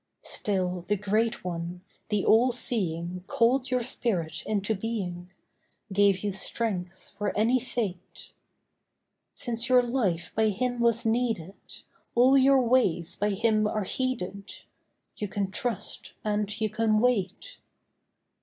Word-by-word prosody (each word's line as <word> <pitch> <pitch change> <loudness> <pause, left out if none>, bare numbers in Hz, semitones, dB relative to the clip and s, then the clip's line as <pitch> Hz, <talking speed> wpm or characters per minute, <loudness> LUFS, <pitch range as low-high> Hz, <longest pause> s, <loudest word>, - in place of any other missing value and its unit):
Still 185 -3 -1
the 210 - +2
Great 215 +3 -1
One, 175 0 -5 0.3
the 210 -2 0
All 240 +4 +5
Seeing 180 -7 +1
Called 250 +3 +2
your 250 -1 0
spirit 195 -9 0
into 210 0 0
being— 190 -5 -4 0.6
Gave 200 -1 +3
you 205 - 0
strength 190 -2 -3
for 205 -1 -2
any 235 +4 +3
fate. 210 -7 -5 1.0
Since 235 0 0
your 250 -1 +5
life 205 -9 -1
by 220 - +3
Him 245 +4 -2
was 235 0 +3
needed, 225 -6 0 0.6
All 255 +3 +5
your 270 0 +5
ways 230 -9 +2
by 205 - 0
Him 215 +1 +1
are 210 0 -2
heeded— 200 -4 -4 0.5
You 210 - -3
can 195 0 -3
trust 235 0 -3
and 210 -1 -1
you 220 - +1
can 215 0 +1
wait. 235 - -1
215 Hz, 125 wpm, -27 LUFS, 190-235 Hz, 1.0 s, All